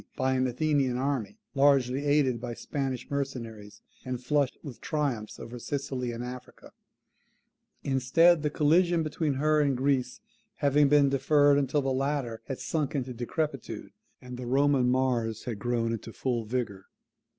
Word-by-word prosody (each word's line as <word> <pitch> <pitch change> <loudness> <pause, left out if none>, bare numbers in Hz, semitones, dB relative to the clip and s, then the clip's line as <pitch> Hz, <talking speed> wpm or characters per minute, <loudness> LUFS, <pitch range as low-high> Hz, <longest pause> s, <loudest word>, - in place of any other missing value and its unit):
by 130 0 +1
an 130 0 +1
Athenian 135 -1 +1
army, 135 - -2 0.2
largely 140 -1 +3
aided 135 -5 +2
by 120 -1 -5
Spanish 135 -2 -4
mercenaries, 115 -7 -5 0.2
and 130 -1 -4
flushed 140 0 +1
with 135 -6 -9
triumphs 135 -8 -2
over 120 +1 -8
Sicily 130 -2 -3
and 120 +1 -5
Africa; 125 0 -10 1.1
instead 140 +6 +4
of - - -8
the 150 - 0
collision 165 +3 +3
between 155 -2 -1
her 155 +2 +2
and 140 -3 +1
Greece 130 -1 0 0.4
having 145 0 +3
been 145 -1 +5
deferred 145 +1 +4
until 140 +1 0
the 135 0 0
latter 135 -4 -2
had 135 - -4
sunk 150 -3 -2
into 130 -2 -2
decrepitude, 135 +3 -4 0.3
and 125 0 -9
the 125 -1 -6
Roman 135 -1 +3
Mars 125 -4 0
had 115 -5 -5
grown 115 0 0
into 115 0 -6
full 120 -4 -2
vigour. 105 -5 -3
130 Hz, 150 wpm, -28 LUFS, 125-145 Hz, 1.1 s, been